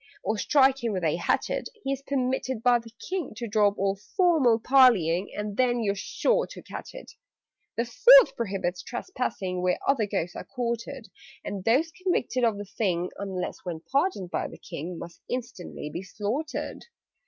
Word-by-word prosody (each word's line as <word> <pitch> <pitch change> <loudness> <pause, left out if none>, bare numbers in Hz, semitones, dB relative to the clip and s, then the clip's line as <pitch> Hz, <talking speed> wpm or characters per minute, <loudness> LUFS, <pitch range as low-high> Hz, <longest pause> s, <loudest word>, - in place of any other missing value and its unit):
Or 215 - 0
strike 270 -1 +3
him 230 -3 0
with 185 -2 -2
a 160 0 +1
hatchet, 175 - -1
He 270 - -1
is 275 - -5
permitted 260 -3 -1
by 245 -1 +5
the 230 0 -12 0.2
King 365 -9 -3
To 235 +1 -5
drop 205 -1 +2
all 195 0 +1 0.2
formal 315 - +4
parleying 215 -9 +4
And 210 0 -4
then 245 -2 +2
you're 200 -2 +1
sure 205 - 0
to - - -11
catch - - -8
it! - - -10 0.7
"The 235 - +1
Fourth - - +7
prohibits 190 -5 -2
trespassing 205 - -3
Where 180 0 +1
other 245 -7 +2
Ghosts 180 -4 -2
are - - -5
quartered: 235 -1 -4 0.4
And 195 -2 -4
those 280 +9 +3
convicted 315 -9 -1
of 225 -3 +2
the 205 - -6
thing 180 -3 -1
(Unless 190 -3 -4
when 170 -3 -5
pardoned 275 - 0
by - - -1
the - - -11
King) 170 +4 -7
Must 170 0 -10
instantly 235 -11 -5
be 175 - -3
slaughtered. 215 +10 -4
230 Hz, 170 wpm, -27 LUFS, 190-265 Hz, 0.7 s, Fourth